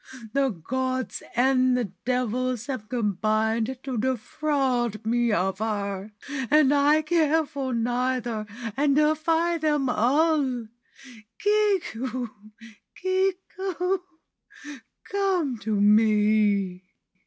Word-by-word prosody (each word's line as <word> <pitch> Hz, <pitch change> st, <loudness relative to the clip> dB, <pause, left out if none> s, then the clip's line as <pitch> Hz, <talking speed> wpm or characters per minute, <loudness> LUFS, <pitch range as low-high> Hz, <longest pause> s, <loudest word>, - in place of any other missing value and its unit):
The 275 Hz, -1 st, +2 dB
gods 255 Hz, +7 st, -3 dB
and 255 Hz, 0 st, +3 dB
the 230 Hz, -7 st, -2 dB
devils 250 Hz, -1 st, -1 dB
have 250 Hz, -6 st, -5 dB
combined 220 Hz, +1 st, 0 dB
to 260 Hz, -4 st, -3 dB
defraud 250 Hz, -2 st, -1 dB
me 235 Hz, +1 st, +1 dB
of 190 Hz, 0 st, 0 dB
her, 205 Hz, -2 st, -3 dB, 0.4 s
and 295 Hz, -1 st, +5 dB
I 295 Hz, +2 st, +4 dB
care 320 Hz, 0 st, +2 dB
for 270 Hz, -2 st, -4 dB
neither 240 Hz, -2 st, -1 dB, 0.3 s
and 280 Hz, 0 st, +2 dB
defy 320 Hz, +3 st, +2 dB
them 295 Hz, -4 st, +1 dB
all. 265 Hz, 0 st, +2 dB, 0.7 s
Kiku, 345 Hz, -, 0 dB, 0.7 s
Kiku, 375 Hz, 0 st, -1 dB, 1.1 s
come 365 Hz, -, 0 dB
to 210 Hz, 0 st, -1 dB
me 210 Hz, -3 st, +3 dB
255 Hz, 90 wpm, -25 LUFS, 220-300 Hz, 1.1 s, and